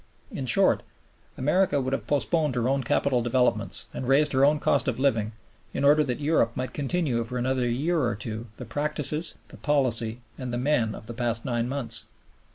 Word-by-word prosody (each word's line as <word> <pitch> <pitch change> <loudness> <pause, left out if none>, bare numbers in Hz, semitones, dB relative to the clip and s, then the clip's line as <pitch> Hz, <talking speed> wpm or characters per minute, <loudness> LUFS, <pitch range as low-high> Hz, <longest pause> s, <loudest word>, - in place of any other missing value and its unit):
In 130 - -5
short, - - +4 0.6
America 150 +2 +2
would 130 0 -2
have 135 - -3
postponed 150 -1 +1
her 120 0 0
own 135 +1 +1
capital 125 +1 +1
developments 125 +1 +1
and 125 - -5
raised 140 +2 +3
her 130 +1 +3
own 150 +2 +5
cost 145 -3 +1
of - - 0
living 115 -6 +1 0.4
in 135 - -1
order 150 +2 +6
that 125 -2 -3
Europe 145 -6 +1
might 130 0 -3
continue 145 -5 -1
for 125 +2 -5
another 125 0 0
year 155 +8 0
or 120 -2 0
two 110 +2 -6
the 125 - -7
practices, 150 +5 0
the - - -12
policy, 120 -6 0 0.2
and 130 -2 -4
the 120 - -2
men 125 -4 +1
of - - -11
the 120 - -7
past 115 -1 -1
nine 120 -2 -1
months. 135 -3 -1
130 Hz, 190 wpm, -26 LUFS, 120-145 Hz, 0.6 s, order